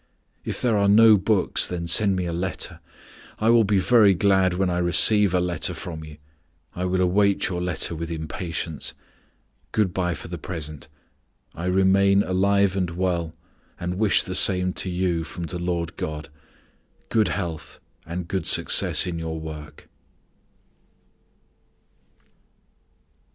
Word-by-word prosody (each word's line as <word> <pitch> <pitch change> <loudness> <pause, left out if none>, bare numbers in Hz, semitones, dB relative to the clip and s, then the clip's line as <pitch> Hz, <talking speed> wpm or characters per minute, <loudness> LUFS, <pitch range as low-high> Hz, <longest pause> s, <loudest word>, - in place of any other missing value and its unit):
If - - -5
there 115 -4 +2
are 100 0 +2
no 110 +2 +7
books 100 0 +1
then 85 -1 -4
send 100 +3 +3
me 90 -1 -2
a 85 - -4
letter. 90 +1 -3 0.6
I 110 +1 +2
will 115 -1 +5
be 100 -1 +1
very 105 -1 +4
glad 95 -1 +2
when 95 +1 0
I 90 -1 -1
receive 100 +3 +5
a 90 - +1
letter 90 -1 -2
from 80 -2 -7
you. 75 -1 -12 0.6
I 90 - -3
will 90 0 0
await 100 +1 +1
your 90 -1 -3
letter 90 -1 -2
with 85 0 -6
impatience. 80 -1 -5 0.8
Good 105 -5 0
by 90 -2 -1
for - - -10
the 85 -1 -7
present. 75 -5 -7 0.7
I 85 - -7
remain 95 +2 +3
alive 100 +1 +1
and 90 -3 -1
well 85 -2 -2 0.4
and 90 +2 -4
wish 110 -3 +3
the 95 - -6
same 90 -1 +3
to 95 - -4
you 90 -2 -1
from 85 +2 -8
the 85 +1 -5
Lord 85 -1 -3
God. 75 -1 -5 0.8
Good 110 -3 +2
health 85 -5 -5 0.2
and 85 +1 -6
good 95 -2 -3
success - - +3
in 85 -2 -4
your 80 -1 -5
work." 75 -1 -10
90 Hz, 145 wpm, -23 LUFS, 85-100 Hz, 0.8 s, no